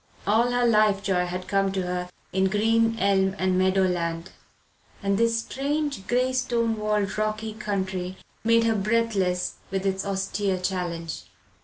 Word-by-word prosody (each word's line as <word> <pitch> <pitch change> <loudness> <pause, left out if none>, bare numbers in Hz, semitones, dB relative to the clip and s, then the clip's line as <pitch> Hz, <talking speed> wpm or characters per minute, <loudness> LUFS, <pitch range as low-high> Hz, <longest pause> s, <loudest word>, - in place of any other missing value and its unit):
All 225 +4 +3
her 245 0 +2
life 215 -3 +3
joy 180 -3 +1
had 180 +1 -5
come 195 -1 +1
to 190 -1 -1
her 180 0 -3 0.2
in 190 0 +2
green 225 +3 +2
elm 195 -1 +2
and 185 -1 +1
meadow 190 +1 +3
land, 170 -2 -1 0.7
and 200 0 +2
this 230 +2 +2
strange 280 -3 -2
grey 255 +1 +1
stone 235 -3 +1
walled 210 -1 -1
rocky 215 0 -2
country 190 -3 -3 0.3
made 230 0 +4
her 230 -1 +3
breathless 205 -4 0
with 195 0 -2
its 190 0 0
austere 195 0 -1
challenge. 175 -3 -3
200 Hz, 150 wpm, -25 LUFS, 185-225 Hz, 0.7 s, made